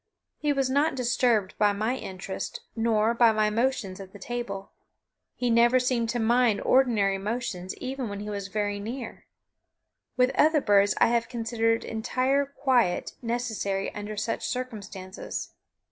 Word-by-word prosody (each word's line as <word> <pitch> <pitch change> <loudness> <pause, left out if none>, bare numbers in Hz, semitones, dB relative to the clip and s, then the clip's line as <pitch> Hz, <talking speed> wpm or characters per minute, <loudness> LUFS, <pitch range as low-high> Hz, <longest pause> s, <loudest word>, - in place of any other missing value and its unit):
He 300 -1 +1
was 275 -2 +1
not 285 +3 +2
disturbed 240 -5 +1
by 205 -1 +4
my 215 +5 -1
interest 190 -5 -6
nor 225 -1 +2
by 235 -1 +5
my 215 -1 +1
motions 225 -5 -1
at 190 -1 -10
the - - -9
table. 200 -2 -5 0.6
He 245 -1 0
never 235 +2 +5
seemed 245 -2 0
to 240 +1 -1
mind 235 -1 +3
ordinary 215 -7 +3
motions 200 -3 -4
even 260 -3 -4
when 200 0 -5
he 210 - -6
was 200 -1 -4
very 205 0 -2
near. 230 +4 -6 0.9
With 250 +1 +4
other 310 +2 +4
birds 205 -5 +3
I - - +5
have 235 -1 +1
considered 230 -1 0
entire 260 +5 0
quiet 260 -9 +1
necessary 230 -5 -2
under 210 0 -6
such 215 +2 -2
circumstances. 205 -6 -6
230 Hz, 145 wpm, -27 LUFS, 205-250 Hz, 0.9 s, by